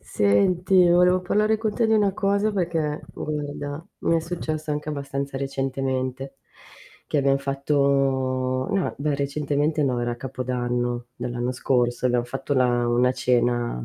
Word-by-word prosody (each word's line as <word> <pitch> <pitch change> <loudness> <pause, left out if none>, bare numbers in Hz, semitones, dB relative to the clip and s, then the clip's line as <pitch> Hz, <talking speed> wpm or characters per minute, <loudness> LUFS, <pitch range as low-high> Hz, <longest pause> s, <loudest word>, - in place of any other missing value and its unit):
Senti, 175 - +3
volevo 180 +1 +4
parlare 215 +4 +2
con 215 -2 -2
te 230 - +2
di - - +3
una 205 -2 +3
cosa 200 +2 +1
perché 165 -5 -1
guarda, 145 +1 -5 0.2
mi 165 - +1
è - - +1
successo 160 -2 -4
anche 150 0 -3
abbastanza 140 -1 -4
recentemente, 135 -1 -3 0.7
che 150 - +1
abbiam 135 0 +3
fatto 135 -2 0
no, 195 -2 0
beh, 145 +1 -1
recentemente 145 +2 0
no, 130 -3 +1
era 120 0 -1
capodanno 120 -1 -2
dell'anno 120 0 -3
scorso, 125 -1 +1
abbiam 125 -1 +2
fatto 135 +3 -3
la 120 -2 +2
una 120 +1 +3
cena 120 - 0
140 Hz, 140 wpm, -24 LUFS, 125-155 Hz, 0.7 s, volevo